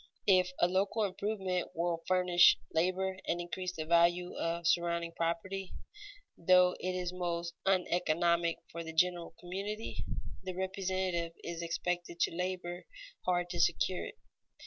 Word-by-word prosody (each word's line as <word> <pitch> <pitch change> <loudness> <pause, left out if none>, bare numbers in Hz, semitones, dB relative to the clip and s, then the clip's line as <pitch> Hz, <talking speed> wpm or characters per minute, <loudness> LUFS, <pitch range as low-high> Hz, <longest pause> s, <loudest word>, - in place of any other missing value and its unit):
If 185 -2 +5
a 175 - +5
local 195 +4 +1
improvement 190 -2 -2
will 170 0 -1
furnish 180 -5 +6 0.2
labor 185 +3 0
and 175 - 0
increase 180 +1 -4
the 155 - -4
value 170 +2 +3
of 170 0 -2
surrounding 170 0 +1
property, 170 +3 -3 0.6
though 180 +1 +5
it 185 0 -2
is 180 -1 -2
most 170 -1 -2
uneconomic 170 -2 +2
for 170 0 -5
the 160 0 -7
general 175 0 +1
community, 200 +5 -4 0.4
the 185 -1 -5
representative 185 -2 -1
is 170 0 -5
expected 175 0 -3
to - - +2
labor 180 -1 -3 0.4
hard 175 -1 +1
to 175 - -3
secure 180 +2 +2
it. - - -11
180 Hz, 135 wpm, -33 LUFS, 170-185 Hz, 0.6 s, furnish